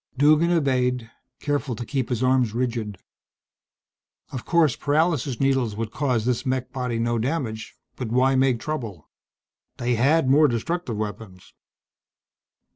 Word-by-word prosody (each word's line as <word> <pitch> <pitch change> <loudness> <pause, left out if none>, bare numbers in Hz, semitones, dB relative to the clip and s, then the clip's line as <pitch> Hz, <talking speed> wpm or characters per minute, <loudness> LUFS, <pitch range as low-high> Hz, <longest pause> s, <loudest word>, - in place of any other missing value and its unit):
Duggan 155 +4 +4
obeyed, 125 -7 +1 0.3
careful 145 -4 -2
to 120 - -6
keep 135 -2 -2
his 125 -1 -1
arms 130 -3 +2
rigid. 115 -5 -2 1.3
Of 130 - -6
course 165 -6 +3
paralysis 145 -4 0
needles 135 -5 +1
would 110 0 -4
cause 125 -6 0
this 125 0 0
mech 130 -1 -2
body 125 -3 -2
no 120 0 0
damage, 120 -4 -3 0.2
but 125 - -4
why 130 +4 +2
make 130 -2 +2
trouble? 115 - -6 0.7
They 120 +1 0
had 135 +5 +3
more 150 +3 +5
destructive 130 0 -2
weapons. 105 -3 -7
125 Hz, 130 wpm, -24 LUFS, 115-140 Hz, 1.3 s, more